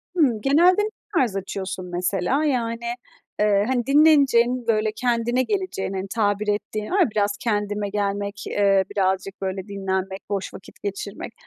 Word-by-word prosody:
Hımm, 260 -11 +2
genelde 345 - +4
ne 425 - -1 0.3
tarz 245 - +2
açıyorsun, 190 -1 -4
mesela? 180 - 0
Yani, 235 -5 -1 0.5
ııı, 205 -1 +3
hani, 245 -2 0
dinleneceğin, 270 -5 +4
böyle, 215 -1 +2
kendine 240 +1 +1
geleceğin, 375 - -2
hani, 190 0 -3
tabir 210 -1 +1
ettiğin 210 +2 -2
var 395 - +2
ya 345 - +4
biraz 205 -1 0
kendime 205 -2 -1
gelmek, 200 0 -2 0.2
ııı, 195 -1 +4
birazcık, 190 0 -1
böyle, 190 0 -3
dinlenmek, 190 -1 -3
boş 200 -2 -3
vakit 185 - -13
geçirmek. 200 +2 -5
210 Hz, 145 wpm, -23 LUFS, 195-245 Hz, 0.5 s, genelde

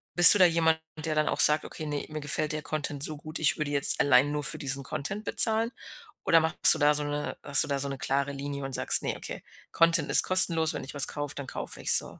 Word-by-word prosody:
bist 175 +1 +12
du 205 - +1
da 185 - +6
jemand, 165 -1 0 0.2
der 155 0 -5
dann 155 0 -1
auch - - -4
sagt: 150 0 +4
„Okay, 155 - -9
ne, 145 -1 -5
mir 155 - -7
gefällt 150 +1 -2
der 155 0 -5
Content 145 -3 -6
so 155 -1 -3
gut, 155 +2 -9
ich 155 - +1
würde 150 -2 -5
jetzt 140 0 +2
allein 145 0 +2
nur 150 0 -4
für 155 - -1
diesen 135 -1 -3
Content 175 +11 -6
bezahlen.“ 225 +1 0 0.5
Oder 165 -1 +3
machst 160 0 +4
du - - -6
da 145 0 +2
so 150 0 -3
'ne 145 0 -6
hast 140 0 +3
du 150 - -8
da 140 -1 -3
so 140 - -3
'ne 135 - -7
klare 140 +2 -3
Linie 140 0 -7
und 135 - -8
sagst: - - +2
„Ne, - - -4
okay, - - -10 0.3
Content 165 -2 +1
ist - - +7
kostenlos. 170 -4 +2
Wenn - - -7
ich 135 - -9
was 140 -2 0
kaufe, 145 -1 -6
dann 140 -2 -8
kaufe - - -6
ich's - - +3
so.“ - - -8
150 Hz, 260 wpm, -26 LUFS, 140-160 Hz, 0.5 s, bist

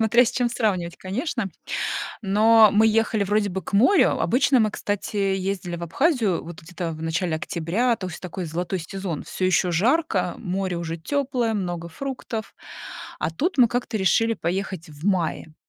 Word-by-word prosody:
Смотря 235 +3 +5
с 235 - 0
чем 245 -1 0
сравнивать, 185 -8 -1
конечно. 230 - -3 0.8
Но 215 +2 +6
мы 215 +2 +5
ехали 220 -1 +2
вроде 205 +1 +1
бы 190 0 -4
к - - -9
морю. 245 - +4
Обычно 260 0 +3
мы, 215 - +2
кстати, 205 +1 -3
ездили 195 -2 -1
в 170 - -8
Абхазию 225 - +1
вот 170 0 -9
где-то 170 0 -5
в 155 0 -8
начале 165 +1 -1
октября, 180 +10 0
то 185 - -5
есть 175 - -8
такой 180 0 -5
золотой 175 +4 -3
сезон. 180 -1 -5
Всё 185 - -2
ещё 185 0 +2
жарко, 195 - +1
море 190 -2 -2
уже 165 -1 -4
тёплое, 250 - -1
много 175 -4 -3
фруктов. 235 +1 -5 0.7
А 155 - 0
тут 330 - -1
мы 245 -2 +7
как-то 245 -1 -2
решили 220 +4 +2
поехать 180 -2 -3
в 150 +5 -8
мае. 170 -4 -1
195 Hz, 170 wpm, -24 LUFS, 175-225 Hz, 0.8 s, мы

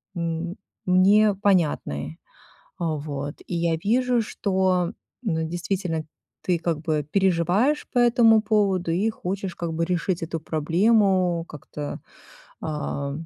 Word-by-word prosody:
м 170 +1 -3 0.3
мне 200 +3 +5
понятны, 150 - 0 0.6
а, 165 -3 0
вот, 145 -1 -5
и 175 - -3
я 170 -1 +1
вижу, 245 +6 +2
что, 185 -4 0 0.3
ну, 160 -8 0
действительно 175 -2 -2 0.4
ты 175 -3 +1
как 165 -2 -2
бы 155 -2 -1
переживаешь 195 - +2
по - - 0
этому 235 -2 +5
поводу 195 -5 +1
и 195 +7 +1
хочешь 195 -2 -4
как 170 -1 -4
бы 165 +1 -1
решить 180 0 -1
эту 165 0 -3
проблему, 180 +2 +2
как-то, 145 0 -7 0.6
ам, 150 0 -4
175 Hz, 120 wpm, -24 LUFS, 160-200 Hz, 0.6 s, мне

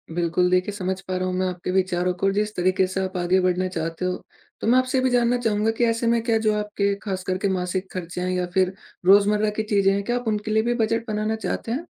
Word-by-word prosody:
बिल्कुल 175 +1 +1
देखिए 185 +3 +2
समझ 190 -1 -3
पा 185 0 -4
रहा 185 0 -1
हूँ 185 - -2
मैं 185 - +1
आपके 180 0 -4
विचारों 180 -1 +1
को 195 - +3
जिस 210 +1 -1
तरीके 185 +1 +2
से 185 +1 -3
आप 185 -1 -4
आगे 180 +2 +2
बढ़ना 185 0 +1
चाहते 165 0 -4
हो। 180 - -2 0.4
तो - - -2
मैं 250 +2 +5
आपसे 255 0 0
भी 260 - +2
जानना 245 0 +2
चाहूँगा 220 -2 +1
कि 240 - +3
ऐसे 230 0 0
में 235 0 +3
क्या 230 -1 +2
जो 215 - +4
आपके 205 -1 -1
खास 190 -3 -3
कर 185 0 -1
के 200 - -1
मासिक 185 0 -2
खर्चे 180 0 -5
हैं 185 - -1
या 180 -1 0
फिर 190 -1 +2 0.3
रोज़मर्रा 205 +2 +5
की - - +1
चीज़ें 200 -2 +2
हैं 200 0 -1
क्या 240 +3 -1
आप 245 -2 -6
उनके 210 0 -1
लिए 220 0 +3
भी 240 +1 +1
बजेट 230 0 0
बनाना 215 0 -1
चाहते 225 +1 -4
हैं? 290 +8 -3
195 Hz, 255 wpm, -23 LUFS, 185-220 Hz, 0.4 s, मैं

